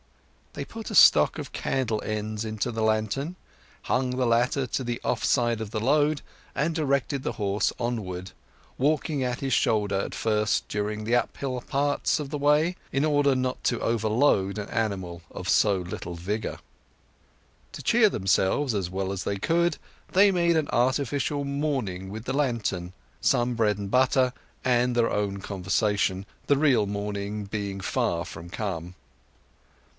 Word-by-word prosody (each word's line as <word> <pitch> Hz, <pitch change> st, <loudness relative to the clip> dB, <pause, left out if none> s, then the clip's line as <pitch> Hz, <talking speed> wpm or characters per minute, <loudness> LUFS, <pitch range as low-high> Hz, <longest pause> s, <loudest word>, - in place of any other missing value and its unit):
They -, -, -5 dB
put 225 Hz, -1 st, -8 dB
a -, -, -3 dB
stock -, -, +7 dB
of -, -, -7 dB
candle 115 Hz, -5 st, -1 dB
ends 110 Hz, 0 st, -3 dB
into 110 Hz, +2 st, -2 dB
the 115 Hz, -1 st, -3 dB
lantern, 110 Hz, -, 0 dB, 0.5 s
hung 130 Hz, 0 st, 0 dB
the 130 Hz, -, +2 dB
latter 120 Hz, +3 st, +2 dB
to 130 Hz, -, -2 dB
the 120 Hz, -1 st, -3 dB
off -, -, -1 dB
side 120 Hz, -3 st, +2 dB
of 110 Hz, -, -4 dB
the 110 Hz, -, -3 dB
load, 145 Hz, +5 st, +2 dB, 0.3 s
and 155 Hz, +4 st, 0 dB
directed 140 Hz, -3 st, 0 dB
the -, -, -2 dB
horse 100 Hz, -1 st, 0 dB
onward, 95 Hz, -6 st, -3 dB, 0.5 s
walking 150 Hz, 0 st, +1 dB
at 125 Hz, -1 st, -2 dB
his 135 Hz, -2 st, -1 dB
shoulder 105 Hz, -3 st, +2 dB
at 95 Hz, -, -2 dB
first 105 Hz, -1 st, +1 dB
during 105 Hz, +1 st, -2 dB
the 115 Hz, +3 st, +1 dB
uphill 130 Hz, +1 st, -1 dB
parts 145 Hz, +3 st, 0 dB
of 145 Hz, -2 st, -5 dB
the 150 Hz, -, -2 dB
way, 150 Hz, +5 st, +3 dB, 0.2 s
in 135 Hz, +3 st, +1 dB
order 145 Hz, -2 st, +3 dB
not 130 Hz, 0 st, -2 dB
to 120 Hz, -, +1 dB
overload 110 Hz, -3 st, +2 dB
an 105 Hz, -, -4 dB
animal 95 Hz, -6 st, -2 dB
of 90 Hz, -, -7 dB
so 100 Hz, 0 st, +4 dB
little 90 Hz, -1 st, -6 dB
vigour. 105 Hz, +6 st, -3 dB, 1.2 s
To -, -, -8 dB
cheer 230 Hz, -2 st, +5 dB
themselves 95 Hz, -, +1 dB
as 95 Hz, -4 st, -1 dB
well 95 Hz, +1 st, -2 dB
as 95 Hz, -, -4 dB
they 100 Hz, -, -2 dB
could, 170 Hz, -, +1 dB, 0.3 s
they 200 Hz, +2 st, +6 dB
made 170 Hz, -2 st, +2 dB
an 155 Hz, -2 st, 0 dB
artificial 140 Hz, +3 st, +1 dB
morning 135 Hz, -10 st, -2 dB
with 110 Hz, +3 st, -7 dB
the 130 Hz, -, -2 dB
lantern, 115 Hz, -10 st, -1 dB, 0.3 s
some 125 Hz, -2 st, +2 dB
bread 110 Hz, -3 st, +1 dB
and 100 Hz, -1 st, -5 dB
butter, 130 Hz, 0 st, +3 dB, 0.3 s
and 125 Hz, -1 st, +2 dB
their 120 Hz, -1 st, +2 dB
own 100 Hz, -1 st, -1 dB
conversation, 100 Hz, 0 st, 0 dB, 0.2 s
the 145 Hz, -, +4 dB
real 135 Hz, -8 st, +3 dB
morning 100 Hz, 0 st, -3 dB
being 100 Hz, -1 st, -4 dB
far 95 Hz, -5 st, -1 dB
from 80 Hz, +1 st, -9 dB
come. 90 Hz, -3 st, -4 dB
115 Hz, 160 wpm, -26 LUFS, 100-140 Hz, 1.2 s, stock